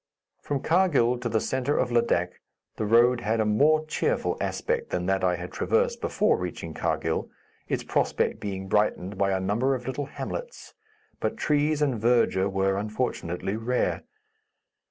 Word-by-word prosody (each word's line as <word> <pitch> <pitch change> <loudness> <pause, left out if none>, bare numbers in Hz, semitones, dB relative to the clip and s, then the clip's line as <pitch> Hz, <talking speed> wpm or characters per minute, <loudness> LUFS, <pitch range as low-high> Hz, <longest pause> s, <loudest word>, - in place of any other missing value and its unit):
From 140 -2 -3
Karghil 150 -9 +3
to 120 - -2
the 110 0 +1
centre 130 +5 -1
of 125 - 0
Ladak, 115 -7 +1 0.4
the 110 - -1
road 120 +2 +4
had 110 0 0
a 110 - +2
more 150 +9 +3
cheerful 155 - 0
aspect - - -2
than 90 0 -2
that 95 0 0
I 90 -1 +3
had 90 +1 -7
traversed - - 0
before - - +1
reaching 90 -2 -5
Karghil, - - -1 0.4
its - - -2
prospect - - 0
being 95 -2 -5
brightened 100 -1 0
by 100 -1 +2
a 95 - +1
number 115 +8 +1
of 125 -1 -7
little 130 +2 -3
hamlets, - - -7 0.5
but - - -2
trees 150 0 +1
and 130 -7 0
verdure 115 -5 +3
were, 95 0 +1
unfortunately, 105 -3 -2
rare. 120 +3 -1
115 Hz, 155 wpm, -26 LUFS, 95-130 Hz, 0.5 s, road